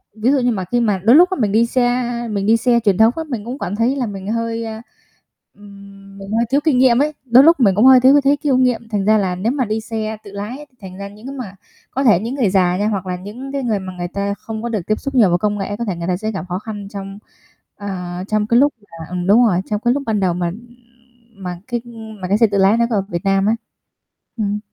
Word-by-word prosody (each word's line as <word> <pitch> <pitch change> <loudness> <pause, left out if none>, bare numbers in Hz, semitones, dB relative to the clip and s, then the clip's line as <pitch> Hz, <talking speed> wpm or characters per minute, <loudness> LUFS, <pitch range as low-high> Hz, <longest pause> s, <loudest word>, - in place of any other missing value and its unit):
ví 225 +4 +1
dụ 280 - +3
như 245 -1 +1
mà 190 -5 -3
khi 245 - +2
mà 215 -4 +1
đôi 230 +5 +6
lúc 355 +4 +7
á, 375 - -3
mình 210 -4 +1
đi 225 +3 +3
xe 245 +1 +1 0.3
mình 200 -1 -2
đi 225 +2 +4
xe 235 +1 +2
truyền 205 -5 +1
thống 220 +1 +5
á, 325 - -2
mình 225 -6 -4
cũng 250 +4 -6
cảm 180 - -3
thấy 235 +5 +1
là 265 -3 -1
mình 195 -3 -7
hơi, 230 0 -2
a, 220 0 -6 0.7
ừm, 200 -1 -15
mình 195 0 -9
hơi 230 +2 +1
thiếu 280 +3 +2
kinh 310 -6 +2
nghiệm 250 -1 +4
ấy, 300 +1 0
đôi 250 +2 +6
lúc 330 +1 +5
mình 200 -7 +4
cũng 215 +5 +4
hơi 260 -1 +8
thiếu 260 +2 +6
cái 290 - +5
thấy 280 +1 +2
kinh 280 -3 +1
nghiệm. 245 -3 0
Thành 205 -3 -1
ra 215 +1 +4
là 190 -3 -1
nếu 210 +7 -1
mà 265 -3 -1
đi 215 +1 -2
xe 220 -1 -4
tự 200 - -11
lái 215 +9 -7
thì 255 - -35
thành 185 -1 -10
ra 200 0 -6
những 210 +5 -13
cái 275 - -7
mà 220 -8 -7 0.4
có 270 - -1
thể 215 -9 +5
những 235 +5 -4
người 245 -8 +1
già 180 -2 +2
nha 205 +2 0
hoặc 200 -4 -2
là 180 -1 -3
những 215 +9 -8
cái 275 -1 -3
người 220 -4 0
mà 190 -1 -7
người 175 0 -3
ta 200 +2 -3
không 220 +1 -7
có 235 - -2
được 215 -4 -2
tiếp 215 - 0
xúc 275 -1 -5
nhiều 220 -7 +5
với 175 - +2
công 210 +2 -1
nghệ, 205 +1 -3
có 235 - -2
thể 195 -5 -2
người 170 0 -5
ta 180 -1 0
sẽ 215 +3 -3
gặp 190 -3 -5
khó 180 +1 -2
khăn 205 -2 -7
trong, 195 0 -8 0.6
à, 180 -3 -6
trong 215 -1 0
cái 235 +2 +4
lúc 290 +2 +3
mà 165 -5 -11
ừm, 180 0 -4
đúng 225 +5 +6
rồi, 185 -5 +2
trong 210 -1 -3
cái 240 - +4
lúc 280 +1 -3
ban 220 -2 0
đầu 185 -3 +1
mà 175 -1 -2 0.9
mà 180 -2 -6
cái 240 -2 -2 0.4
mà 185 - -3
cái 200 +3 +2
xe 230 0 +4
tự 200 -1 -2
lái 195 +3 +4
nó 235 - +3
có 230 - -1
ở - - +2
Việt 170 -3 -4
Nam 195 0 +2
á. 220 +2 +2 0.8
Ừm. 210 -1 -1
215 Hz, 285 wpm, -18 LUFS, 195-245 Hz, 0.9 s, hơi